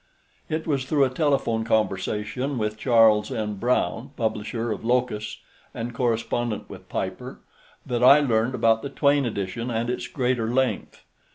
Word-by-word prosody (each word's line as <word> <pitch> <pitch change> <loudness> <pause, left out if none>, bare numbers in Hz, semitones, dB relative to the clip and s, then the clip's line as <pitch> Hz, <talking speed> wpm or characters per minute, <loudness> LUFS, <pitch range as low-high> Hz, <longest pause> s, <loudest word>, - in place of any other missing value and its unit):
It 160 0 -2
was 140 -5 -1
through 145 0 +2
a 130 - -2
telephone 135 -6 +1
conversation 110 +4 -1
with 105 -1 -1
Charles 110 -2 +4
N. 105 -1 -2
Brown, 120 +3 0
publisher 115 +1 -2
of 105 - -4
Locus 120 -3 -1 0.4
and 120 +1 -4
correspondent 115 -1 -1
with - - -12
Piper, - - -4 0.5
that 120 -1 -1
I 140 +3 +8
learned 120 -3 +1
about 115 -2 +3
the 140 - -5
Twayne 140 -2 +2
edition 110 +3 -4
and 115 +1 -1
its 125 0 -4
greater 125 -3 -1
length. 125 -3 -1
120 Hz, 150 wpm, -24 LUFS, 110-130 Hz, 0.5 s, I